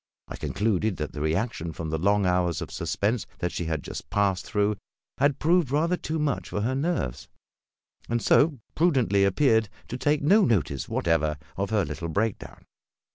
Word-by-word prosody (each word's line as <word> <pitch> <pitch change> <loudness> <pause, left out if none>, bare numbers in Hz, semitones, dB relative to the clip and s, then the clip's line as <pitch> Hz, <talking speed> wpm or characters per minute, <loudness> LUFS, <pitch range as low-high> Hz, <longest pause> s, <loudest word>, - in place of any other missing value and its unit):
I - - -7
concluded 105 -1 -1
that 75 -2 -4
the 75 - -5
reaction 80 +1 -1
from 80 -1 -5
the 80 - -1
long 100 +3 +2
hours 90 -2 +1
of - - -6
suspense 105 +2 -1
that 90 -1 -2
she 85 - -3
had 80 -2 -2
just - - -7
passed 100 -3 0
through 105 -1 +1 0.4
had 140 0 +3
proved 170 -2 +2
rather 160 +6 +2
too 160 -2 -3
much 150 -3 -1
for 105 - -2
her 120 +5 0
nerves, 140 - -2 0.8
and 120 0 +1
so 145 +4 +3 0.2
prudently 130 - +3
appeared 110 +1 +3 0.2
to 125 - -4
take 145 +2 +1
no 200 +8 +5
notice 85 - 0
whatever 80 -2 +1 0.2
of 100 +1 -2
her 105 -4 +1
little 85 - -5
break 105 +5 0
down. - - -12
105 Hz, 180 wpm, -26 LUFS, 90-140 Hz, 0.8 s, no